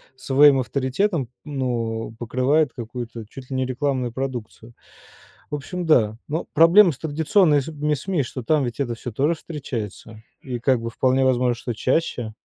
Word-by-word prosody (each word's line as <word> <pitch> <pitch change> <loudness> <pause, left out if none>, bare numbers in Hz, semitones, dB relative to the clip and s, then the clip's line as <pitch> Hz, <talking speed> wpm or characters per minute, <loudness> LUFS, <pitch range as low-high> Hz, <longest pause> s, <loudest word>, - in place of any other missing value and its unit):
своим 135 +1 +5
авторитетом, 135 - -1 0.2
ну, 120 -6 -3
покрывает 130 +5 +1
какую-то 120 -1 -7
чуть 130 +1 -11
ли 135 - -4
не 130 0 0
рекламную 130 -1 -1
продукцию. 120 -3 -6 0.8
В 150 - -1
общем, 175 +6 -5
да. 110 -9 +3
Ну, 160 +3 -2
проблема 170 +4 +7
с 135 - -11
традиционными 160 +1 +2 0.3
с 140 - -6
СМИ, 185 -6 0
что 130 0 -6
там 150 +3 +2
ведь 120 +1 -5
это 120 -4 -1
всё 120 0 -7
тоже 145 +8 +1
встречается 115 - -7 0.2
и, 125 -2 -5
как 125 0 +2
бы, 115 - -4
вполне 130 +2 +2
возможно, 125 -1 +2
что 120 0 -5
чаще. 125 -2 -1
130 Hz, 160 wpm, -23 LUFS, 120-150 Hz, 0.8 s, проблема